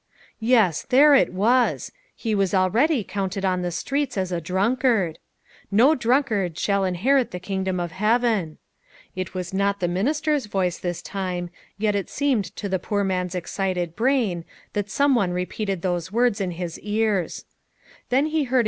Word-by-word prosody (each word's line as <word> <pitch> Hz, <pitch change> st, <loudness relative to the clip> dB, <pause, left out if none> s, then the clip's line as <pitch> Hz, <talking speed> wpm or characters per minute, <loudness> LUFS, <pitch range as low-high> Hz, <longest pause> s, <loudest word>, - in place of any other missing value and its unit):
Yes, 220 Hz, -8 st, +3 dB
there 290 Hz, +3 st, +7 dB
it 275 Hz, -, +4 dB
was! 235 Hz, +7 st, +2 dB, 0.2 s
he 225 Hz, -2 st, -2 dB
\vas 195 Hz, -2 st, +1 dB
already, 230 Hz, -, +2 dB
counted 195 Hz, 0 st, -3 dB
on 185 Hz, -1 st, +1 dB
the 180 Hz, -, -1 dB
streets 275 Hz, -, -2 dB
as 185 Hz, -1 st, -1 dB
a 175 Hz, -1 st, -2 dB
drunkard. 195 Hz, -, +1 dB, 0.3 s
" -, -, -29 dB
No 280 Hz, +5 st, +6 dB
drunkard 235 Hz, -, +1 dB
shall 200 Hz, -1 st, +1 dB
inherit 240 Hz, +9 st, +2 dB
the 180 Hz, -, -6 dB
kingdom 190 Hz, 0 st, -2 dB
of 175 Hz, -1 st, -3 dB
heaven." 210 Hz, -3 st, +1 dB, 0.6 s
It 185 Hz, 0 st, -5 dB
was 180 Hz, 0 st, -4 dB
not 200 Hz, +1 st, +1 dB
the 175 Hz, -, 0 dB
minister's 285 Hz, -, 0 dB
voice 185 Hz, -4 st, -1 dB
this 175 Hz, -2 st, -4 dB
time; 180 Hz, -3 st, -4 dB, 0.3 s
yet 210 Hz, 0 st, +1 dB
it 200 Hz, -3 st, -2 dB
seemed 270 Hz, -8 st, +1 dB
to 205 Hz, -, -4 dB
the 190 Hz, -1 st, -1 dB
poor 205 Hz, +2 st, -1 dB
man's 185 Hz, -1 st, -1 dB
excited 180 Hz, -1 st, -2 dB
brain 230 Hz, -9 st, +1 dB, 0.3 s
that 205 Hz, -1 st, -2 dB
some 280 Hz, +5 st, +3 dB
one 195 Hz, -8 st, +1 dB
repeated 185 Hz, +1 st, -3 dB
those 175 Hz, -1 st, -2 dB
words 235 Hz, -2 st, +2 dB
in 190 Hz, -, -1 dB
his 175 Hz, -1 st, -5 dB
ears. 210 Hz, -4 st, -1 dB
195 Hz, 155 wpm, -23 LUFS, 180-235 Hz, 0.6 s, there